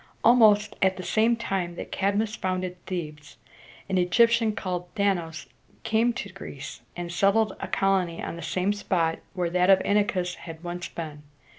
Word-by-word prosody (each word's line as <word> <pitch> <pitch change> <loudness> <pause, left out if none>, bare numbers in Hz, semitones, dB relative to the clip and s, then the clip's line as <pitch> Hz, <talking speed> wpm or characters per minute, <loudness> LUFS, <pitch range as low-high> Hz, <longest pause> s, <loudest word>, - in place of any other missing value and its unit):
Almost 215 -3 +5
at 190 -1 +3
the 185 - -6
same 225 +5 +3
time 190 -6 -2
that - - -7
Cadmus 205 +3 0
founded 185 -2 -3
Thebes, 150 -5 -6 0.5
an 190 -2 +1
Egyptian 230 +4 +3
called 180 -3 -3
Dan´a 200 -4 +2
us 160 0 -9 0.4
came 225 +2 +2
to 200 -4 -5
Greece, 140 -7 -8 0.2
and 175 -1 -4
settled 200 +3 +2
a - - -4
colony 190 -3 +1
on - - -4
the 170 - -8
same 185 +4 0
spot 170 -5 0 0.2
where 175 -2 -1
that 180 +1 +2
of 195 - +8
Inachus 195 -3 +1
had 165 -1 -10
once 175 0 -4
been. 155 -3 -7
185 Hz, 165 wpm, -26 LUFS, 175-205 Hz, 0.5 s, of